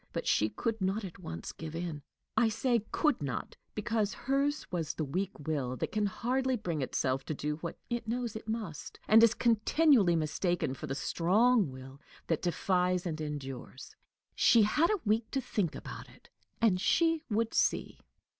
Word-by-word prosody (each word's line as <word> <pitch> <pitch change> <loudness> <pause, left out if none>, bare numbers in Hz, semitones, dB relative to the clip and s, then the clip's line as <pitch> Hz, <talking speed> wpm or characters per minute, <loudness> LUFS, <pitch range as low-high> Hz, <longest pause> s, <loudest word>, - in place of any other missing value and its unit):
But - - -3
she 105 - +3
could 220 - -3
not 195 +3 0
at 185 0 -9
once 85 - -6
give 160 -1 -8
in. 165 -3 -4 0.3
I 225 0 +4
say 230 0 +1
"could 300 - +1
not," 135 -4 -4 0.2
because 215 -1 0
hers 280 +2 0
was 165 -4 -2
the 155 - -2
weak 185 +8 -3
will 135 -5 -1
that - - -3
can 210 -1 +1
hardly 255 +5 0
bring 170 -8 -3
itself 130 0 -1
to 155 - -3
do 150 +1 -2
what 170 +1 -6
it 240 -2 -3
knows 235 -1 -2
it 220 - -7
must, 215 -9 -5
and 220 +1 +7
is 230 0 +6
continually 235 - +4
mistaken 165 -1 0
for - - -7
the 135 - -3
strong 205 - +3
will 130 +2 -11 0.2
that 165 - 0
defies 180 +1 +1
and 160 -2 -3
endures. 135 -3 -6 0.4
She 230 -2 +5
had 300 +11 +3
a 425 -2 +1
week 220 +2 +1
to 270 - -1
think 205 - -1
about - - -8
it, - - -20 0.3
and 200 -6 +3
she 330 - +3
would 225 +1 0
see! - - +1
195 Hz, 175 wpm, -31 LUFS, 155-230 Hz, 0.4 s, and